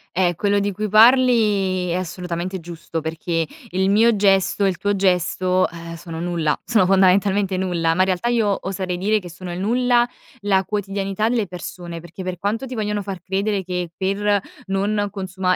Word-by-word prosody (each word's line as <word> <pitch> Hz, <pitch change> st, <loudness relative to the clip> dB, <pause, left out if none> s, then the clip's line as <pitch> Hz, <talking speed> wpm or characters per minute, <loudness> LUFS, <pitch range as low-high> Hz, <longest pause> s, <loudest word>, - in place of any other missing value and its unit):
Eh, 175 Hz, -1 st, +2 dB
quello 205 Hz, +4 st, +1 dB
di 200 Hz, 0 st, 0 dB
cui 210 Hz, +2 st, -3 dB
parli 215 Hz, -6 st, +4 dB
è -, -, 0 dB
assolutamente 180 Hz, 0 st, -4 dB
giusto, 165 Hz, -1 st, -6 dB
perché 165 Hz, +1 st, -2 dB, 0.2 s
il 190 Hz, +1 st, +1 dB
mio 225 Hz, +2 st, +4 dB
gesto 195 Hz, 0 st, +2 dB
e -, -, +4 dB
il 180 Hz, -, -3 dB
tuo 205 Hz, 0 st, 0 dB
gesto, 185 Hz, 0 st, +1 dB
eh, 170 Hz, 0 st, -8 dB
sono 165 Hz, -1 st, -7 dB
nulla, 170 Hz, -3 st, -1 dB
sono 215 Hz, -6 st, +3 dB
fondamentalmente 195 Hz, 0 st, +3 dB
nulla, 170 Hz, -3 st, 0 dB
ma 180 Hz, -, -4 dB
in -, -, +5 dB
realtà 185 Hz, +5 st, 0 dB
io 215 Hz, -4 st, +2 dB
oserei 185 Hz, -2 st, -3 dB
dire 210 Hz, +4 st, +1 dB
che 180 Hz, -3 st, -10 dB
sono 175 Hz, +1 st, -8 dB
il 175 Hz, -, -5 dB
nulla, 240 Hz, +3 st, +2 dB, 0.3 s
la 195 Hz, -2 st, +2 dB
quotidianità 200 Hz, +1 st, -2 dB
delle 235 Hz, -4 st, +1 dB
persone, 175 Hz, -1 st, -7 dB
perché 175 Hz, +3 st, -9 dB
per 180 Hz, -1 st, -4 dB
quanto 220 Hz, +6 st, -2 dB
ti 255 Hz, -, -7 dB
vogliono 210 Hz, -2 st, -2 dB
far 190 Hz, -3 st, -6 dB
credere 195 Hz, +2 st, -1 dB
che 180 Hz, -2 st, -4 dB
per 200 Hz, +1 st, 0 dB, 0.2 s
non 205 Hz, +1 st, 0 dB
consuma 185 Hz, -2 st, -1 dB
190 Hz, 180 wpm, -21 LUFS, 180-205 Hz, 0.3 s, in